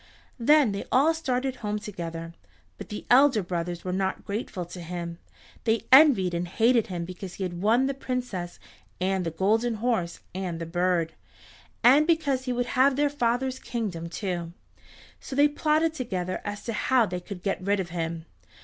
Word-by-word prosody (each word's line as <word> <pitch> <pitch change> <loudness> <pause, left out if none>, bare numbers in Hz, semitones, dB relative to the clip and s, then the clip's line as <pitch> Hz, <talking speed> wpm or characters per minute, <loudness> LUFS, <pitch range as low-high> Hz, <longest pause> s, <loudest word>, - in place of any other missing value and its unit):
Then 285 0 +5
they 200 - -3
all 285 +6 +4
started 265 -4 -2
home 210 -1 -2
together. 170 -6 -6 0.5
But - - -8
the 210 - -6
elder 255 -4 +6
brothers 175 0 -4
were 180 - -2
not 190 0 -2
grateful 200 -3 -4
to 175 +1 -9
him. 170 0 -6 0.4
They 225 0 +1
envied 260 - +7
and 175 +1 -2
hated 230 +4 +3
him 175 -4 -4
because 180 0 -8
he 195 - -4
had 175 -1 -4
won 230 +6 +3
the 275 - 0
Princess 250 -10 -4 0.4
and 190 0 0
the 165 - -1
Golden 220 +8 +1
Horse 215 -7 -1
and 180 -3 -4
the 165 - -4
bird, 175 -1 0 0.7
and 280 +6 +6
because 285 -6 +1
he 250 - -1
would 245 0 0
have 265 +1 +4
their 290 +1 +2
father's 255 -1 0
kingdom, 185 -8 -4
too. 175 -3 -4 0.7
So 265 - -7
they 290 +2 +6
plotted 310 +2 +1
together 185 - -3
as 205 0 -5
to 230 - -3
how 250 +2 +3
they 180 -2 -4
could 180 0 -9
get 195 -2 -1
rid 200 +2 +1
of 180 -2 -3
him. 165 -1 -3
205 Hz, 175 wpm, -26 LUFS, 175-255 Hz, 0.7 s, envied